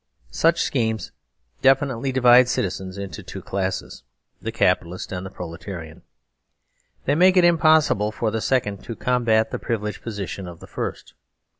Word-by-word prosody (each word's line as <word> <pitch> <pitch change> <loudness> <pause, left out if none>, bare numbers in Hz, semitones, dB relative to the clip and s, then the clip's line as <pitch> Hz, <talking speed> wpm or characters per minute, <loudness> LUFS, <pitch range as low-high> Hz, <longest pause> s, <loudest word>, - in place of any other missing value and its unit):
Such 165 +1 +2
schemes 110 -4 -1 0.5
definitely 135 -1 +2
divide 125 -1 +6
citizens 95 -2 -2
into 100 -7 -6
two - - -9
classes, 95 -1 -3 0.4
the - - -3
Capitalist 90 0 0
and 90 -1 -4
the 95 - -6
Proletarian. 85 -2 -8 1.0
They 140 - +2
make 185 +4 +5
it 180 - +6
impossible 155 -10 +4
for 110 0 -2
the 110 0 -2
second 105 -7 0
to 115 - -5
combat 115 -3 +1
the - - -3
privileged 105 -2 -3
position 100 -4 -5
of 85 -2 -10
the - - -11
first. - - -6
110 Hz, 145 wpm, -23 LUFS, 95-130 Hz, 1.0 s, divide